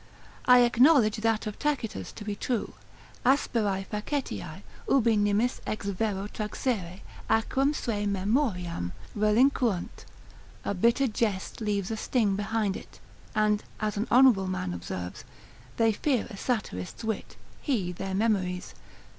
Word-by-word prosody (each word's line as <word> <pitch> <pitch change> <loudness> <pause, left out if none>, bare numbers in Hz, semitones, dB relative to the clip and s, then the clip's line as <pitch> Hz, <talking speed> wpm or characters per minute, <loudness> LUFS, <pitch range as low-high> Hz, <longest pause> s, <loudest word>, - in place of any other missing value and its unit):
I 250 0 +8
acknowledge 245 -2 +5
that 225 0 +1
of 210 -1 -5
Tacitus 235 - -2
to 210 - -9
be 205 -1 -2
true, 235 +2 -2 0.5
Asperae 220 -7 +1
facetiae, 210 - -4 0.3
ubi 235 -4 +4
nimis 205 +4 +1
ex 215 - -3
vero 200 0 -1
traxere, 210 -4 -3 0.3
acrem 265 +6 +2
sui 205 -6 -1
memoriam 190 - -1 0.2
relinquunt, 215 -1 +2 0.6
a - - 0
bitter 235 +8 +3
jest 215 -4 -2
leaves 205 -2 -1
a 220 - -2
sting 215 -3 +1
behind 205 0 -1
it: - - -11 0.4
and 210 -1 +2 0.2
as 215 -1 -1
an 210 +3 -1
honourable 245 -7 +6
man 185 - -2
observes, 90 +1 -6 0.5
They 225 -1 +4
fear 255 +1 0
a - - -7
satirist's 195 - -3
wit, 220 -1 -3 0.3
he 215 - 0
their 190 +2 -4
memories. 190 -4 0
215 Hz, 130 wpm, -28 LUFS, 195-235 Hz, 0.6 s, I